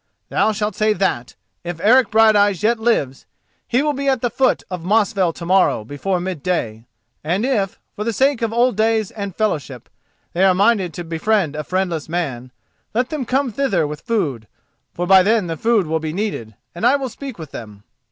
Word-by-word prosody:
Thou 220 - +2
shalt 210 0 -2
say 215 +2 +2
that, 180 - -2 0.3
if 175 -1 -5
Eric 245 +7 +4
Brighteyes 210 -3 +4
yet 230 +1 +2
lives, 185 - 0 0.4
he 250 +4 +1
will 300 -1 +1
be 280 0 -3
at 260 -3 +1
the 245 - 0
foot 265 -1 +1
of 180 -2 -5
Mosfell 200 -2 +2
to 170 - -8
morrow 185 - +3
before 175 - -2
midday, 165 -11 -3 0.4
and 180 +9 0
if, 210 -8 0 0.2
for 210 - -3
the 230 - -1
sake 265 +3 +1
of 230 -1 0
old 240 0 +2
days 220 -1 +1
and 200 -4 -6
fellowship, 145 - -2 0.4
they 180 - +1
are 190 -1 +5
minded 200 -2 +2
to 175 - -5
befriend 165 0 0
a 150 - -3
friendless 175 -3 -2
man, 130 -8 -3 0.4
let 245 +2 0
them 300 -5 -3
come 265 +1 0
thither 205 - 0
with 150 0 -6
food, 140 - -2 0.4
for 175 - -3
by 190 +1 +7
then 195 -4 +1
food 225 +1 +2
will 160 +1 -1
be 155 -1 -4
needed, 175 - -4 0.2
and 175 - -8
I 250 +4 +5
will 275 -2 -2
speak 270 0 -8
with 160 -4 -9
them. 105 -3 -10
195 Hz, 190 wpm, -20 LUFS, 165-225 Hz, 0.4 s, by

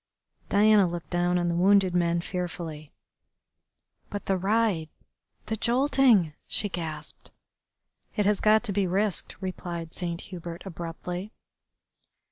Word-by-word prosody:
Diana 205 -1 +5
looked 170 -1 -6
down 175 0 +1
on 175 -1 0
the 170 - 0
wounded 190 +1 +4
man 170 -1 +1
fearfully. 170 -4 -5 1.2
"But 205 - -5
the 195 - +1
ride 195 -4 +1 0.6
the 220 - -2
jolting," 240 - +3
she 205 - 0
gasped. 160 -4 -6 0.9
"It 210 - +1
has 205 0 +2
got 215 +1 +4
to 225 - -2
be 195 -1 +1
risked," 195 +2 +1
replied 170 -3 -5
Saint 170 -2 -3
Hubert 170 -2 -8
abruptly. 175 +3 -6
180 Hz, 120 wpm, -27 LUFS, 170-205 Hz, 1.2 s, Diana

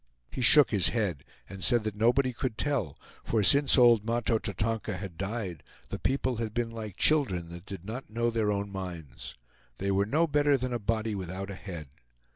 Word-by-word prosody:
He - - -5
shook 145 +3 +7
his 100 -6 +4
head, 100 - -1 0.2
and 95 -1 -9
said 120 -3 +4
that 110 -1 -3
nobody 125 +5 +2
could 120 -2 -4
tell, 125 - -1 0.3
for 110 -2 0
since 140 +8 +5
old 120 -4 +6
Mahto 115 0 0
Tatonka 105 0 -3
had 95 -2 -7
died, 95 -2 -4 0.3
the - - -5
people 130 -2 -1
had 110 -1 -4
been 120 -1 -1
like 110 -4 -8
children 95 - +2
that 85 +3 -11
did 95 -3 -8
not 120 +5 -7
know 115 +2 -1
their 110 -2 0
own 100 0 -3
minds. 90 -7 -8 0.4
They 100 +1 -2
were 100 +1 +1
no 155 +8 +2
better 145 -2 +2
than 125 -1 -3
a 120 - -2
body 110 +1 -1
without 95 +1 -5
a - - -5
head. 85 -6 -8
110 Hz, 195 wpm, -28 LUFS, 95-120 Hz, 0.4 s, shook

